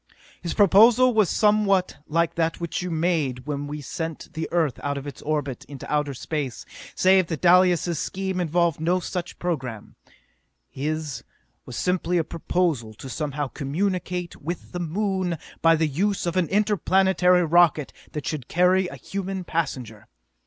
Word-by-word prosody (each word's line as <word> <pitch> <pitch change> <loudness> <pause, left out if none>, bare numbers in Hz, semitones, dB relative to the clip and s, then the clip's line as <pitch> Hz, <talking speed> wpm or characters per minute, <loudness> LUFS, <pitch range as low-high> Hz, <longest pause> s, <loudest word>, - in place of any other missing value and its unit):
"His 170 - -4
proposal 225 +6 +6
was 215 -4 +3
somewhat 205 -6 +2
like 165 +1 +1
that 165 -1 -1
which 170 0 -3
you 180 - -3
made 155 -7 0
when 145 -1 -3
we 150 +1 -5
sent 165 +3 -6
the 160 0 -4
Earth 160 -7 +1
out 140 0 -2
of 140 - -6
its 145 - -8
orbit 145 -4 -2
into 140 +1 -7
outer 150 -2 0
space, 140 -2 -4 0.3
save 185 -1 +4
that 160 -3 -4
Dalis' 175 -2 +4
scheme 190 -1 -3
involved 170 -2 +1
no 175 +3 +1
such 180 0 -5
program. 130 -11 -4 0.7
His 150 -3 -4 0.4
was 125 - -7
simply 180 +1 0
a 165 - +2
proposal 160 -9 -1
to 135 - -9
somehow 145 -1 -3
communicate 180 +4 -2
with 170 +4 -5
the 175 - -4
Moon 185 0 -1 0.2
by 165 0 +6
the 160 0 +1
use 195 +8 -1
of 170 - -2
an 180 -3 +1
interplanetary 190 -3 +3
rocket 160 -3 +3 0.2
that 150 - -4
should 150 -6 -4
carry 180 +2 +3
a - - -8
human 195 -1 -5
passenger. 125 - -3
170 Hz, 155 wpm, -24 LUFS, 150-185 Hz, 0.7 s, proposal